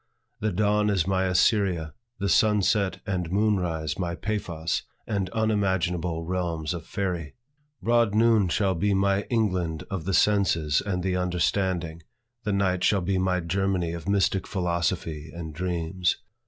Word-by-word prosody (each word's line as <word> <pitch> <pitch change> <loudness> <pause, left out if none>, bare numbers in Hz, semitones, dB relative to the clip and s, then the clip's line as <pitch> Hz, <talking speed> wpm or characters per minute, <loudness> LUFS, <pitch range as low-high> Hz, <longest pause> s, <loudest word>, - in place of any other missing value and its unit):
The 110 0 0
dawn 105 +2 +2
is 95 -5 +1
my 95 0 +1
Assyria; 90 -4 +2 0.2
the 100 -1 -2
sun 105 0 +3
set 100 -1 +1
and 90 -4 -2
moon 105 +1 +2
rise 80 -3 -3
my 85 -2 -2
Paphos, 85 -6 -2 0.2
and 100 -4 -2
unimaginable 95 -6 0
realms 85 -3 -2
of 85 -2 -7
faerie; 90 -6 -3 0.5
broad 115 -2 +3
noon 110 -3 +4
shall 95 +2 +1
be 100 +3 +1
my 100 +1 +1
England 90 -9 0
of 90 -5 -3
the 95 -1 +1
senses 85 -8 +3
and 90 -3 -2
the 95 -1 0
understanding; 90 -2 0 0.4
the 105 - 0
night 95 -2 +1
shall 100 -2 +3
be 95 +1 0
my 90 -1 +1
Germany 90 0 0
of 85 +3 -5
mystic 100 -1 +1
philosophy 85 -4 -2
and 80 -2 -7
dreams. 90 +1 -1
95 Hz, 150 wpm, -26 LUFS, 85-100 Hz, 0.5 s, noon